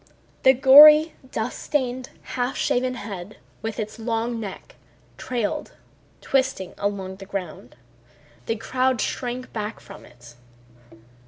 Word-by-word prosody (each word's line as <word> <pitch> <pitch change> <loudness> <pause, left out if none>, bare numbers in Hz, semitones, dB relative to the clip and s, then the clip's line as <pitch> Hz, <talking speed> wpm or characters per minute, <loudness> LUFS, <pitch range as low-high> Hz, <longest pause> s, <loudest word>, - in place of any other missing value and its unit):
The 260 - +6
gory, 300 +4 +8 0.2
dust 225 +3 -3
stained, 255 -3 -2 0.2
half 250 +1 -2
shaven 255 +1 0
head 205 -3 -8 0.2
with 225 -1 -5
its 215 +1 -5
long 230 +1 -2
neck 215 - -8 0.4
trailed 235 -5 -3 0.5
twisting 260 -9 -1
along 195 -2 -3
the 195 0 -11
ground. 180 -10 -7 0.7
The 225 - 0
crowd 255 +2 0
shrank 250 +2 -4
back 215 0 -5
from - - -13
it. 120 -1 -16
230 Hz, 115 wpm, -23 LUFS, 205-255 Hz, 0.7 s, gory